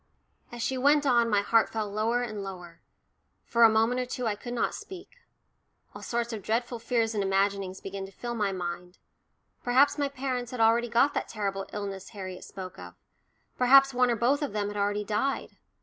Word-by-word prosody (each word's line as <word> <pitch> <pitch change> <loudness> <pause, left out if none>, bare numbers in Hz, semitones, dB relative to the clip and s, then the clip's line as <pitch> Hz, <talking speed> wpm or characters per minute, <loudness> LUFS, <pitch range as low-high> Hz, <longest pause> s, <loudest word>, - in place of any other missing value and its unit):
As 240 -1 -5
she 260 -1 -1
went 290 +2 +4
on, 240 -3 +3
my 205 -2 +3
heart 225 +2 +3
fell 220 -2 -3
lower 220 +4 0
and 215 -4 -5
lower 180 -4 -9 0.6
for 235 - 0
a 230 - +9
moment 225 +3 +2
or 250 - -4
two 250 0 -4
I 220 - +1
could 240 +4 -7
not - - 0
speak. 380 +4 -10 0.8
All - - -10
sorts 235 0 -2
of 215 - -5
dreadful 235 +4 -2
fears 230 -1 0
and 205 -2 0
imaginings 195 -1 0
began 195 0 -6
to - - -14
fill 240 +5 -5
my 210 -4 0
mind; 180 -1 -5 0.7
perhaps 260 +5 +4
my 285 -1 +1
parents 255 -3 -3
had 250 - -6
already 230 +2 +3
got 245 +5 +3
that - - -2
terrible 195 -3 -3
illness 195 -2 -5
Harriet 185 -4 -8
spoke 185 -2 -9
of, 90 -1 -10 0.6
perhaps 270 +2 +6
one 250 0 +3
or 235 - +2
both 255 +7 +2
of 290 -7 -3
them 205 -1 -1
had 205 - -7
already 205 +1 0
died. 215 +7 -2
225 Hz, 195 wpm, -28 LUFS, 200-245 Hz, 0.8 s, a